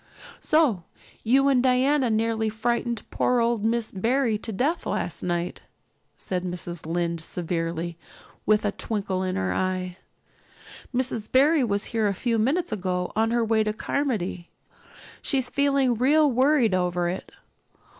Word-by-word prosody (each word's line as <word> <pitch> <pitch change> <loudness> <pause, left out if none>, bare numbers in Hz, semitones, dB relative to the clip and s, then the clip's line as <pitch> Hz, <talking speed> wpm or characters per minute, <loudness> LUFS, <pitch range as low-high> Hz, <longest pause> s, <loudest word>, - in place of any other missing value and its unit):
"So 295 - +2 0.4
you 270 +4 +4
and 265 -3 +4
Diana 260 +1 +3
nearly 220 0 0
frightened 235 +1 -1
poor 250 -1 +1
old 230 -2 +1
Miss 225 0 0
Barry 230 +4 +1
to 225 - -6
death 275 - -1
last - - -2
night?" 175 0 -2 0.6
said 180 -1 -3
Mrs. 175 -2 -5
Lynde 170 0 -1
severely, 165 0 -3 0.4
but - - -43
with 215 0 +3
a 205 - +1
twinkle 200 -3 -3
in 185 -1 -2
her 95 -1 -1
eye. 185 - -2 0.9
"Mrs. 245 -4 -1
Barry 285 +3 +4
was 205 -3 -1
here 220 -2 +2
a 200 - -1
few 230 +2 0
minutes 300 +10 +1
ago 180 -3 -2
on 225 +1 +2
her 235 0 +1
way 220 0 +2
to 215 0 -1
Carmody. 215 -8 -2 0.7
She's 260 -3 -1
feeling 275 -3 +2
real 285 +5 +3
worried 255 -3 +3
over 180 -1 0
it. 180 +2 -5
220 Hz, 145 wpm, -25 LUFS, 185-255 Hz, 0.9 s, you